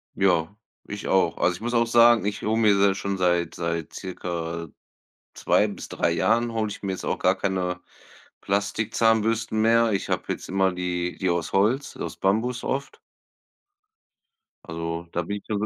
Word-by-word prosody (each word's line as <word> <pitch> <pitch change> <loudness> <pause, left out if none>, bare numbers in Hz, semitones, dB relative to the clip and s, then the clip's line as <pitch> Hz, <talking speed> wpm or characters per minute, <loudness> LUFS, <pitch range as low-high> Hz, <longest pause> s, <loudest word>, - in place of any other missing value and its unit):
Ja, 90 -2 +2 0.3
ich 105 0 -6
auch. 95 - +2
Also, 90 - +2
ich 90 - -12
muss 120 +2 -3
auch 115 -1 +3
sagen, 115 -1 +5
ich 105 +1 -2
hole 110 +1 0
mir 105 -3 +4
da 100 0 +4
schon 100 0 -3
seit 85 -2 +1
seit 85 -1 -3
circa 85 -3 -5 0.7
2 - - +2
bis - - -8
3 - - 0
Jahren 115 +7 +1
hole 110 -1 -1
ich - - -8
mir 100 - -2
jetzt 95 - -5
auch - - -2
gar 95 +1 +3
keine 90 -2 -1 0.6
Plastikzahnbürsten 110 +2 +1
mehr. 115 0 +4
Ich 95 - -2
habe - - -1
jetzt - - -8
immer 95 0 +2
die 90 -1 -3
die 95 - 0
aus 85 -2 -2
Holz, 115 +8 +1
aus - - -5
Bambus 115 +6 0
oft. 140 +1 -3 1.7
Also, 85 +1 -5
da 85 - -1
bin 100 +5 -4
ich 100 - -12
dann 105 -2 -1
so 105 - 0
100 Hz, 175 wpm, -25 LUFS, 90-110 Hz, 1.7 s, sagen